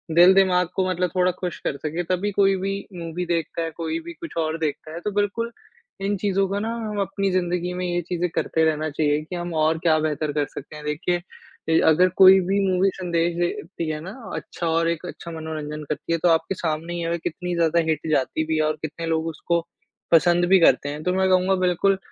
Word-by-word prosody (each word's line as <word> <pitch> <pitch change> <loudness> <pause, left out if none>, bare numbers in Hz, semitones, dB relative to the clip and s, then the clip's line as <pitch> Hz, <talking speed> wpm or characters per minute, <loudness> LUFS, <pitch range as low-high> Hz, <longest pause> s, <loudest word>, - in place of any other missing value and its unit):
दिल-दिमाग 180 0 +6
को 190 -1 +1
मतलब 180 0 0
थोड़ा 180 0 +3
खुश 180 -2 -3
कर 140 - -3
सके 160 +4 -3
तभी 185 +3 0
कोई 195 0 +3
भी 195 +1 -2 0.2
मूवी 170 0 -4
देखता 170 -1 -2
है, 165 0 -2
कोई 165 - -3
भी 340 +1 -9
कुछ 335 -1 -9
और 160 0 0
देखता 155 0 -3
है 170 - -5
तो 210 - 0
बिल्कुल, 205 +3 -1 0.5
इन 200 +1 0
चीज़ों 195 0 +1
को 200 +1 -2
ना 225 +2 -2
हम 215 -3 -4
अपनी 195 0 -1
ज़िंदगी 180 -1 -1
में 180 0 -3
ये 175 0 -1
चीज़ें 175 +1 -2
करते 160 - +1
रहना 155 0 0
चाहिए 150 0 +1
कि 170 +4 -7
हम 175 0 -4
और 160 +1 +2
क्या 160 -1 +3
बेहतर 155 -1 -1
कर 145 -1 +1
सकते 145 - -10
हैं 150 0 -9
देखिए 150 +4 0
अ, 170 -2 -2
अगर 180 +4 +5
कोई 190 0 +9
भी 200 +1 +2
मूवी 185 +1 +3
संदेश 170 -2 0
देती 175 -1 -3
है 155 -1 -3
ना 180 +4 -7 0.2
अच्छा 170 - -5
और 165 +1 +2
एक 170 +1 -3
अच्छा 170 -1 -8
मनोरंजन 155 -2 -5
करती 150 +2 -4
है - - +2
तो 175 - +5
आपके 165 +3 +2
सामने 165 0 -3
ये 165 - -2
है 170 - 0
कितनी 175 +1 -4
ज़्यादा 170 0 +2
हिट 155 0 -1
जाती 150 +2 +1
भी 160 - 0
है - - +2
और 155 0 0
कितने 160 +2 -5
लोग 160 0 0
उसको 165 +1 -1 0.5
पसंद 175 +1 +5
भी 190 0 +7
करते 155 -4 +4
हैं 150 +1 -5
तो 180 - +1
मैं 190 0 +2
कहूँगा 185 +1 +3
बिल्कुल, 185 +2 +2
175 Hz, 225 wpm, -23 LUFS, 160-185 Hz, 0.5 s, कोई